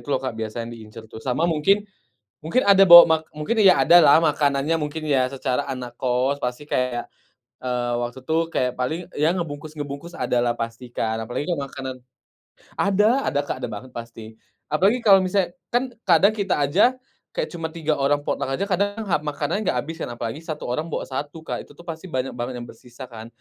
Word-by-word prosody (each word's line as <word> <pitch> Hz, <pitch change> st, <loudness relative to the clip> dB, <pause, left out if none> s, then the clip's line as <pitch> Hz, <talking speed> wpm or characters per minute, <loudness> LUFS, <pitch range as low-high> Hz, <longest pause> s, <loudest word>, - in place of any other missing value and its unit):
itu -, -, -17 dB
loh 140 Hz, -, +2 dB
Kak, 130 Hz, -, -2 dB
biasa 110 Hz, +2 st, -4 dB
yang 120 Hz, -, -8 dB
diincer 110 Hz, 0 st, -11 dB
tuh, 110 Hz, 0 st, -11 dB
sama 130 Hz, +7 st, -1 dB
mungkin, 175 Hz, +5 st, +2 dB, 0.6 s
mungkin 170 Hz, +11 st, +1 dB
ada 195 Hz, -1 st, +6 dB
bawa 175 Hz, 0 st, +12 dB
mak 160 Hz, -1 st, +2 dB
mungkin, 215 Hz, +10 st, -1 dB
ya 190 Hz, -, +6 dB
ada 175 Hz, -, +8 dB
lah 140 Hz, -, +7 dB
makanannya, 145 Hz, 0 st, +1 dB
mungkin 150 Hz, +1 st, -4 dB
ya 130 Hz, -3 st, +2 dB
secara 135 Hz, 0 st, -1 dB
anak 125 Hz, -3 st, -6 dB
kos, 130 Hz, +3 st, 0 dB
pasti 125 Hz, +3 st, -3 dB
kayak, 125 Hz, -3 st, -1 dB, 0.5 s
eee, 125 Hz, -1 st, -1 dB
waktu 120 Hz, +2 st, -5 dB
itu 160 Hz, +4 st, 0 dB, 0.2 s
kayak 125 Hz, -1 st, +1 dB
paling 130 Hz, +7 st, -1 dB, 0.2 s
yang 155 Hz, +4 st, +2 dB
ngebungkus-ngebungkus, 145 Hz, 0 st, -6 dB
ada 125 Hz, -, 0 dB
lah 120 Hz, -, +2 dB
pasti 115 Hz, +2 st, -5 dB
Kak, 110 Hz, -1 st, -2 dB
apalagi 120 Hz, +4 st, -3 dB
kalo 170 Hz, -, -1 dB
makanan 130 Hz, -1 st, -6 dB, 0.8 s
ada 210 Hz, +7 st, +3 dB
ada 140 Hz, -, +1 dB
Kak 145 Hz, -, -5 dB
ada 125 Hz, -, -2 dB
banget 110 Hz, +5 st, -8 dB
pasti, 115 Hz, -1 st, -9 dB, 0.4 s
apalagi 195 Hz, +11 st, +3 dB
kalo 195 Hz, -3 st, +7 dB
misalnya 185 Hz, -1 st, 0 dB, 0.2 s
kan 250 Hz, +1 st, +1 dB, 0.2 s
kadang 190 Hz, +4 st, +5 dB
kita 200 Hz, -6 st, 0 dB
aja, 180 Hz, -, +3 dB, 0.4 s
kayak -, -, -1 dB
cuma 165 Hz, -2 st, -4 dB
3 160 Hz, -2 st, -1 dB
orang 140 Hz, +1 st, +1 dB
potong -, -, -1 dB
aja, 180 Hz, +9 st, -1 dB
kadang 205 Hz, +3 st, -1 dB
makanan 150 Hz, +4 st, -1 dB
gak -, -, +1 dB
abis 160 Hz, +2 st, -7 dB
kan -, -, -4 dB
apalagi 115 Hz, +4 st, -5 dB
1 155 Hz, -2 st, -6 dB
orang 150 Hz, +7 st, -2 dB
bawa -, -, -2 dB
1 145 Hz, +4 st, -5 dB
Kak, -, -, -4 dB
itu -, -, -19 dB
tuh 170 Hz, -, -13 dB
pasti 165 Hz, +2 st, -7 dB
banyak 130 Hz, -1 st, -2 dB
banget 125 Hz, +1 st, -4 dB
yang 120 Hz, -, -8 dB
bersisa 125 Hz, +2 st, -12 dB
kan. 115 Hz, -2 st, -10 dB
145 Hz, 195 wpm, -23 LUFS, 125-170 Hz, 0.8 s, bawa